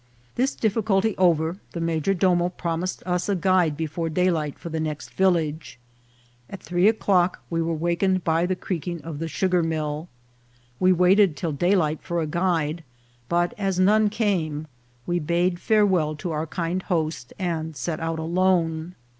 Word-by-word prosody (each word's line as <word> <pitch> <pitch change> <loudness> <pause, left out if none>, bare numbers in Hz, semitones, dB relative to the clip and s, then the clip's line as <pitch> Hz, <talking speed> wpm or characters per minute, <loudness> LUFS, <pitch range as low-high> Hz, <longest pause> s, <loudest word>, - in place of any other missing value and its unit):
This 260 +3 0
difficulty 215 -1 +1
over, 170 0 +2
the 170 - -4
major 165 +3 0
domo 175 -1 +2
promised 175 0 -3
us 180 +1 -1
a 200 - +2
guide 180 -4 +2
before 165 +1 -3
daylight 160 -3 0
for 170 - -8
the 160 0 -3
next 155 -3 -4
village. 160 -7 0 0.7
At 195 - -7
three 175 +4 +1
o'clock 190 -5 +2
we 165 0 0
were 165 0 -1
wakened 175 +3 0
by 165 +2 +1
the 185 - 0
creaking 175 -3 -4
of 160 -3 -6
the 165 - -3
sugar 180 +2 +1
mill. 155 0 -2 0.7
We 185 0 +4
waited 180 -1 +4
till 165 +2 -2
daylight 160 0 +1
for 170 -1 -2
a 160 - 0
guide, 165 -1 -1 0.5
but 175 0 +1
as 195 -2 0
none 210 +3 +4
came 170 -9 -1 0.4
we 175 0 0
bade 175 +3 0
farewell 190 -9 +2
to 170 +3 -5
our 155 +1 -2
kind 175 +2 -2
host, 155 -9 -2
and 160 -4 -3
set 155 +5 -3
out 165 0 -2
alone. 170 0 0
175 Hz, 160 wpm, -24 LUFS, 160-185 Hz, 0.7 s, We